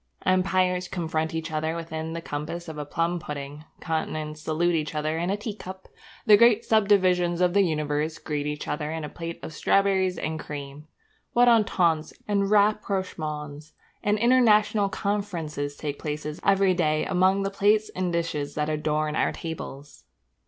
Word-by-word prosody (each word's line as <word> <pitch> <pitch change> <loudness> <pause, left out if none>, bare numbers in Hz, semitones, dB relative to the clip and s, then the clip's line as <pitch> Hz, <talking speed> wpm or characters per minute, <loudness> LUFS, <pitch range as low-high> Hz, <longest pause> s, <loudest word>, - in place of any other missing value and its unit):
Empires 185 -1 +2
confront 160 -3 -2
each 160 0 -3
other 155 +1 -1
within 160 -1 -5
the 165 - -4
compass 155 +4 -5
of 155 -2 -7
a 150 - -4
plum 165 +4 -1
pudding; 145 0 -7
continents 155 -1 -3
salute 165 +3 +1
each 155 -1 -2
other 155 +1 -1
in 175 +2 -1
a 200 - 0
tea 210 +1 -5
cup; 190 -2 -9 0.4
the 215 -3 +8
great 230 +1 +5
subdivisions 185 -5 +3
of 180 -1 +3
the 200 - +5
universe 155 -2 -1
greet 150 -1 -3
each 150 0 -4
other 150 +1 -2
in 160 -1 -4
a 150 - -5
plate 165 0 -7
of 160 - -7
strawberries 190 +1 +2
and 155 0 -3
cream. 145 0 -8 0.5
What 245 +1 +5
ententes, 180 -9 +3
and 200 -1 +1
rapprochements, 165 -8 -1 0.3
and 210 +1 +1
international 215 -3 +4
conferences 175 -9 -3
take 145 -1 -5
place 150 0 -4 0.2
every 195 -1 +4
day 155 -3 +1
among 190 +1 +2
the 195 - -2
plates 210 +2 +2
and 185 -1 -1
dishes 155 -4 -2
that 150 0 -1
adorn 150 0 -1
our - - +1
tables! 145 -3 -8
165 Hz, 160 wpm, -26 LUFS, 155-195 Hz, 0.5 s, the